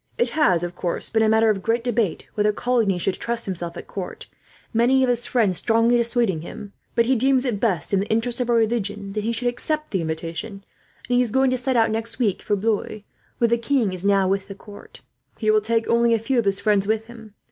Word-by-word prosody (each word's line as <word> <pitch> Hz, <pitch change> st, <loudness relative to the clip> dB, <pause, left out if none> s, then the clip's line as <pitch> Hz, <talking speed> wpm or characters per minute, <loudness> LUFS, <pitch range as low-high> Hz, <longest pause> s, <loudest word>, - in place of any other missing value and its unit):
It 475 Hz, -, +2 dB
has, 185 Hz, -, +2 dB
of 175 Hz, 0 st, -4 dB
course, 175 Hz, -1 st, -1 dB
been 225 Hz, -, +2 dB
a 220 Hz, -, +3 dB
matter 220 Hz, 0 st, +4 dB
of 195 Hz, -2 st, -3 dB
great 230 Hz, +3 st, 0 dB
debate 230 Hz, -7 st, -1 dB
whether 210 Hz, 0 st, +2 dB
Coligny 225 Hz, -4 st, 0 dB
should 185 Hz, +2 st, 0 dB
trust 235 Hz, 0 st, -2 dB
himself 175 Hz, -3 st, -5 dB
at -, -, -8 dB
court, 190 Hz, -3 st, -6 dB, 0.5 s
many 250 Hz, +4 st, +3 dB
of 255 Hz, -, +2 dB
his 240 Hz, -1 st, +1 dB
friends 210 Hz, -8 st, +1 dB
strongly 230 Hz, +1 st, +3 dB
dissuading 235 Hz, -7 st, +1 dB
him; 200 Hz, +4 st, -9 dB, 0.2 s
but 235 Hz, -, +3 dB
he 260 Hz, +2 st, +2 dB
deems 260 Hz, +2 st, +2 dB
it 230 Hz, -6 st, -1 dB
best, 195 Hz, -7 st, -1 dB
in 195 Hz, -, +3 dB
the 200 Hz, -, -2 dB
interests 230 Hz, +3 st, -1 dB
of 245 Hz, -, -2 dB
our 240 Hz, -, +3 dB
religion, 210 Hz, -3 st, -1 dB
that 210 Hz, +1 st, -3 dB
he 230 Hz, -, -1 dB
should 235 Hz, +1 st, -1 dB
accept 305 Hz, +6 st, -2 dB
the 190 Hz, -, 0 dB
invitation; 165 Hz, +5 st, -5 dB, 0.4 s
and 245 Hz, -1 st, +1 dB
he -, -, +4 dB
is 245 Hz, -, 0 dB
going 265 Hz, +3 st, +2 dB
to -, -, +1 dB
set 255 Hz, +1 st, -1 dB
out 225 Hz, -2 st, +3 dB
next 225 Hz, +1 st, -3 dB
week 210 Hz, -7 st, 0 dB
for 205 Hz, -, 0 dB
Blois, 215 Hz, +1 st, -2 dB, 0.4 s
where 235 Hz, -, +3 dB
the 235 Hz, +1 st, +1 dB
king 230 Hz, -6 st, 0 dB
now 200 Hz, -1 st, +3 dB
is -, -, 0 dB
with 195 Hz, 0 st, -1 dB
the 195 Hz, -, -8 dB
court. 205 Hz, +1 st, -14 dB, 0.4 s
He 215 Hz, -2 st, +1 dB
will 215 Hz, 0 st, +3 dB
take 225 Hz, +1 st, 0 dB
only 235 Hz, 0 st, +3 dB
a -, -, +2 dB
few 240 Hz, +3 st, 0 dB
of 230 Hz, -, -1 dB
his 195 Hz, 0 st, +1 dB
friends 200 Hz, -1 st, +1 dB
with 220 Hz, +1 st, 0 dB
him. 225 Hz, -3 st, -13 dB
225 Hz, 245 wpm, -22 LUFS, 200-240 Hz, 0.5 s, matter